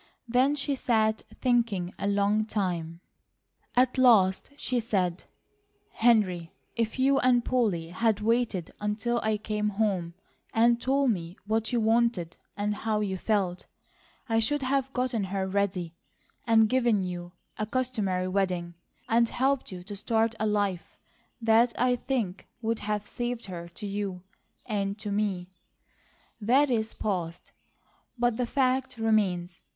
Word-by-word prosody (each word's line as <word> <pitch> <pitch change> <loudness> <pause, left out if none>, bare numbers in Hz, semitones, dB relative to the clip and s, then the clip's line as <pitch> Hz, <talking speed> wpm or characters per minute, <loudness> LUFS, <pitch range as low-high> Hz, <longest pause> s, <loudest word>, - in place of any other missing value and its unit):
Then 255 +5 +3
she 285 0 -1
sat 220 -4 +1 0.2
thinking 230 -8 +1
a 200 - -1
long 205 +1 +2
time. 175 -6 -3 0.7
At 255 +1 +3
last 205 -7 +5
she 250 -3 -1
said: 190 -6 -1 0.7
"Henry, 190 -8 +2 0.2
if 230 0 -1
you 270 +1 +3
and 245 -2 +3
Polly 200 -10 0
had 215 +3 +1
waited 220 -5 0
until 220 +3 0
I 220 -1 +1
came 210 0 -1
home, 195 -5 -1 0.4
and 235 +1 +4
told 270 -1 +2
me 175 -2 -4
what 220 +2 0
you 240 - +2
wanted 225 -6 +1 0.2
and 205 +1 0
how 215 -1 0
you 195 -2 -1
felt, 190 -2 -1 0.6
I 225 -1 +2
should 280 +5 0
have 270 0 0
gotten 250 -5 -1
her 190 0 -2
ready, 190 -3 -1 0.5
and 225 -1 +5
given 235 -4 +2
you 175 -1 -5 0.3
a 215 - -1
customary 215 -7 -1
wedding, 185 -3 -1 0.3
and 230 0 +3
helped 270 -1 0
you 180 -1 -7
to 205 +2 -7
start 225 +2 +1
a 215 - +1
life 205 -4 -1 0.4
that 230 +1 +3
I 250 0 +3
think 235 -7 -3 0.2
would 225 0 0
have 210 0 -3
saved 240 -1 -3
her 170 -3 -7
to 210 - -6
you, 200 -3 -4 0.4
and 200 -2 -2
to 210 -1 -5
me. 195 -3 -1 0.9
That 260 +6 +4
is 225 -2 -1
past, 175 -5 -3 0.7
but 240 -1 +1
the 245 - 0
fact 260 -1 0
remains. 195 -6 0
215 Hz, 140 wpm, -28 LUFS, 190-240 Hz, 0.9 s, last